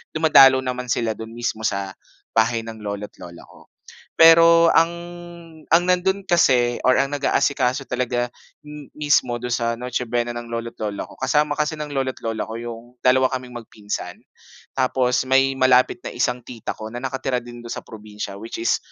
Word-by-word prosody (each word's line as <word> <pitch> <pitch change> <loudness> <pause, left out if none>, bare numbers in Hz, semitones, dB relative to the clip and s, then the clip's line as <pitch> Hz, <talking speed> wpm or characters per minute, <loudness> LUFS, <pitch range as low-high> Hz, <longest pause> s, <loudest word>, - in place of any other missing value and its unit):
dumadalaw 135 -4 +6
naman 125 0 -4
sila 115 -1 0
dun 110 +1 -9
mismo 120 -2 -3
sa 100 -1 -3 0.4
bahay 115 0 +2
ng 110 -1 -8
lolo't 100 0 -6
lola 85 -1 -11
ko. - - -19 0.5
Pero 165 0 +7
ang 165 +1 +4 0.8
ang 170 +1 +5
nandun 190 +2 +1
kasi 125 -9 +3
or 130 - +5
ang 135 +1 +1
nag-aasikaso 135 -1 0
talaga 125 -1 -1 0.3
m 150 -1 -10
mismo 145 -5 +1
dun 125 - -4
sa 115 -1 -1
Noche 125 0 -3
Buena 120 0 -1
ng 120 0 -6
lolo't 115 0 -5
lola 105 -2 -4
ko, - - -16
kasama 145 +3 +1
kasi 150 +1 0
ng 150 -1 -5
lolo't 130 -1 -2
lola 115 -1 -2
ko 110 - -7
yung 115 -1 -7 0.2
dalawa 130 +1 +4
kaming 125 -1 -5
magpinsan, 110 -3 -7 0.5
tapos 130 -1 +1
may 135 +1 +3
malapit 130 -1 +4
na - - -3
isang 125 0 0
tita 120 -3 -7
ko 110 - -8
na 120 - -6
nakatira 130 -1 -2
din 120 0 -11
dun 120 - -6
sa - - -6
probinsiya, 105 -2 -8
which 115 +3 -7
is, 115 - +2
125 Hz, 175 wpm, -22 LUFS, 115-135 Hz, 0.8 s, Pero